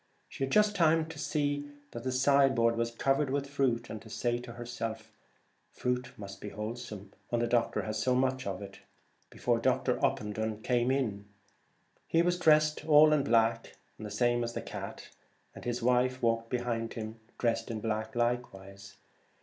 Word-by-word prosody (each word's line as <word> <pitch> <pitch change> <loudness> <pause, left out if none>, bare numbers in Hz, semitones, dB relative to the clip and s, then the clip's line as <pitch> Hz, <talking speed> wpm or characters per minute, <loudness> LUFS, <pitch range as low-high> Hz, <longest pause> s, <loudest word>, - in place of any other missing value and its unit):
She - - -5
had 135 - -7
just 210 -1 +4
time 165 -3 +4
to 160 -2 -9
see 145 -1 -1 0.2
that 120 - -7
the 130 - -1
side 135 +1 +4
board 115 -1 +3
was 115 0 0
covered 135 +4 +1
with 140 +1 -1
fruit, 130 -4 0
and 110 - -7
to 110 - -13
say 120 +2 -1
to 120 -1 -9
her 120 +1 -8
self, 115 -2 -5 0.3
' - - -42
Fruit 125 0 -2
must 100 -1 -9
be 105 - -5
wholesome 105 -2 -7 0.2
when 120 - 0
the - - +2
doctor 120 0 +1
has 110 -1 -3
so 125 +2 +2
much,' 130 -1 0 0.8
before - - 0
Dr. - - +1
Opendon 110 +1 -1
came 120 -1 +2
in. 110 -7 -1 0.8
He 165 +1 +3
was 175 0 +1
dressed 155 -2 +4
all 155 0 +7
in 145 -2 +3
black, 115 -1 +2 0.2
the 105 -1 -6
same 120 +3 +1
as 115 0 -3
the - - -3
cat, - - -7 0.4
and - - -11
his 120 -1 -2
wife 125 +1 +2
walked 115 0 +1
behind 120 -2 -2
him 110 0 -6 0.2
dressed 115 -2 0
in 115 -2 -3
black 110 +2 -3
likewise. 100 -5 -3
120 Hz, 175 wpm, -31 LUFS, 110-135 Hz, 0.8 s, all